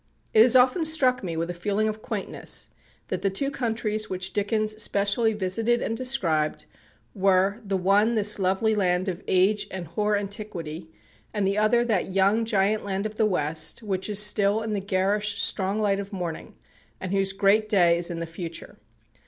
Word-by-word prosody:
It 220 - +6
has 245 +3 +6
often 255 +7 +4
struck 270 -7 +2
me 170 -3 -4
with 170 +2 -2
a - - -6
feeling 205 +5 -1
of 215 0 -4
quaintness - - -3 0.4
that - - -3
the 195 - +1
two 275 +9 -1
countries 220 -4 -2
which 185 0 -3
Dickens 215 +1 -1
specially 205 +3 +1
visited 215 +4 0
and 225 - -2
described, 180 -12 0 0.5
were, 195 +2 +2
the 195 -2 -1
one 200 +5 +2
this 210 -1 +3
lovely 195 +4 +1
land 185 -2 0
of 185 0 -4
age 190 +3 +2
and 185 -2 -6
hoar 210 +6 0
antiquity, 185 -6 -6 0.5
and 205 -2 0
the 200 +2 +1
other 235 +3 +3
that 205 -5 -1
young 200 +4 +2
giant 210 -1 +1
land 195 0 -3
of 215 0 -5
the 220 - +3
West, 155 +1 -1
which 190 -1 -2
is 205 - -1
still 210 +1 +2
in 220 -1 -3
the 205 - -1
garish 200 +2 -1
strong 195 0 +1
light 205 -2 +1
of 200 0 -7
morning, 175 -5 -6 0.4
and 185 - -5
whose 195 -1 +1
great 205 +2 +2
day 175 -5 +4
is 170 - +1
in 170 - -5
the 170 - -4
future. 165 0 -8
200 Hz, 185 wpm, -25 LUFS, 185-215 Hz, 0.5 s, It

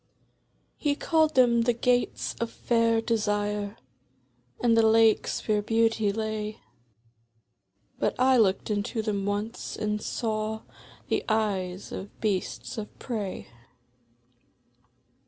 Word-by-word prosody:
He 290 -2 0
called 315 0 +2
them 240 -2 +5
the 240 +1 +2
Gates 245 +1 0
of 235 - 0
Fair 230 -1 +1
Desire, 210 -2 -1 0.8
And 235 -2 +3
the 225 - +6
Lakes 220 0 +3
where 210 -1 +2
Beauty 225 -1 +2
lay, 215 0 -3 1.4
But - - 0
I 260 0 +5
looked 200 -1 +2
into 215 +2 -1
them 200 -2 -1
once, 205 +3 -3
and 210 0 -1
saw 220 -1 -2 0.5
The - - +1
eyes 195 -4 -1
of 195 - -8
Beasts 210 +1 -2
of 210 - -8
Prey. 200 - -5
220 Hz, 110 wpm, -27 LUFS, 205-230 Hz, 1.4 s, the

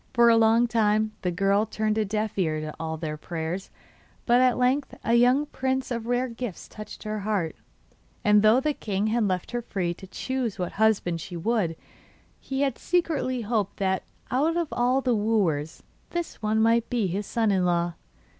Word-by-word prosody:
For 235 -1 +6
a - - +6
long 225 +1 +5
time 215 -2 +2
the 180 - 0
girl 195 +4 +2
turned 215 0 -1
a 220 - +2
deaf 215 +1 -2
ear 160 -5 0
to 155 0 -5
all 160 0 -3
their 155 -1 -4
prayers; 165 +4 -4 0.6
but 245 +1 +4
at 255 -1 +3
length 255 +3 +1
a 230 - +1
young 250 +5 +4
prince 265 -2 -2
of 230 -1 -3
rare 245 +1 +1
gifts 230 -5 -6
touched 215 0 -10
her 215 0 -3
heart, 200 -5 -1 0.7
and 210 0 +5
though 215 +4 +5
the 300 +2 0
king 205 -5 -2
had 220 0 +1
left 185 -2 -2
her 240 0 -2
free 185 -6 -2
to 190 +2 -12
choose 255 +2 -3
what 180 -1 -3
husband 195 -6 +1
she 175 +2 -7
would, 185 -3 0 0.6
he 270 0 -3
had 275 -4 0
secretly 315 -8 0
hoped 210 -3 -1
that 190 -1 0 0.3
out 310 +6 +2
of 340 -3 -1
all 250 +2 +2
the 255 -2 +1
wooers 200 -9 0 0.3
this 345 -7 -4
one 215 0 +1
might 230 +1 +3
be 235 -4 0
his 190 +3 -2
son 225 -3 +1
in 190 -2 +2
law. 175 -1 +1
220 Hz, 190 wpm, -26 LUFS, 190-245 Hz, 0.7 s, For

